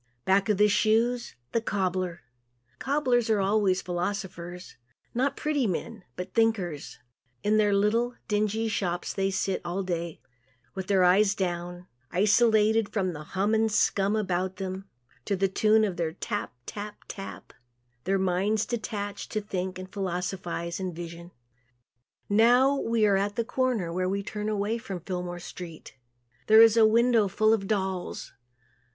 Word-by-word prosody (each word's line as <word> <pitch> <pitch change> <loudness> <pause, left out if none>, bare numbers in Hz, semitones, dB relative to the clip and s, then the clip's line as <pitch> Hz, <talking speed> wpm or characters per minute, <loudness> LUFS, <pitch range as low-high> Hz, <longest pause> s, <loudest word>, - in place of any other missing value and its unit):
Back 195 +2 +3
of 210 - +3
the 210 +1 +5
shoes 230 +4 +1 0.2
the 230 - +1
cobbler. 185 - -2 0.6
Cobblers 255 -4 +1
are 215 -2 +3
always 195 -1 +2
philosophers. 180 -1 -4 0.4
Not 270 +3 0
pretty 290 -5 0
men, 210 +3 -4
but 180 +1 -6
thinkers. 200 -10 0 0.5
In 210 +1 +3
their 210 -1 +3
little, 225 +5 +2
dingy 215 +1 0
shops 180 -5 -2
they 195 0 0
sit 190 0 -1
all 175 +3 -2
day 170 -3 -3 0.5
with 190 -1 -5
their 195 -2 +3
eyes 195 +3 +4
down, 175 -1 -3 0.2
isolated 215 +2 +3
from 190 -4 -1
the 150 -1 -7
"hum 195 +7 -1
and 220 0 +2
scum" 200 0 +2
about 185 -3 -1
them, 190 0 -6 0.4
to 200 - 0
the 195 +1 +2
tune 215 +3 +3
of 190 -4 -1
their 165 -2 -1
"tap, 205 +3 -4
tap, 210 0 -7
tap," 195 -1 -8 0.5
their 195 +1 +1
minds 190 +3 +1
are 225 - -8
detached 205 -4 -4
to 215 - +1
think 190 -3 -4
and 185 +1 -9
philosophize 180 -2 -3
and 185 -3 -4
vision. 170 0 -8 1.0
Now 245 +6 +5
we 230 -5 +1
are 200 -2 +4
at 200 +1 -1
the 235 - -1
corner 235 -9 -1
where 185 +1 0
we 200 +1 -1
turn 210 +1 -4
away 215 +2 -1
from 190 -5 -6
Fillmore 180 0 -4
street. 175 -2 -9 0.5
There 220 +1 +9
is 225 -1 +6
a 225 -1 +6
window 230 -1 +4
full 215 +3 +3
of 195 -3 -1
dolls. 190 -3 -3
200 Hz, 155 wpm, -27 LUFS, 185-220 Hz, 1.0 s, There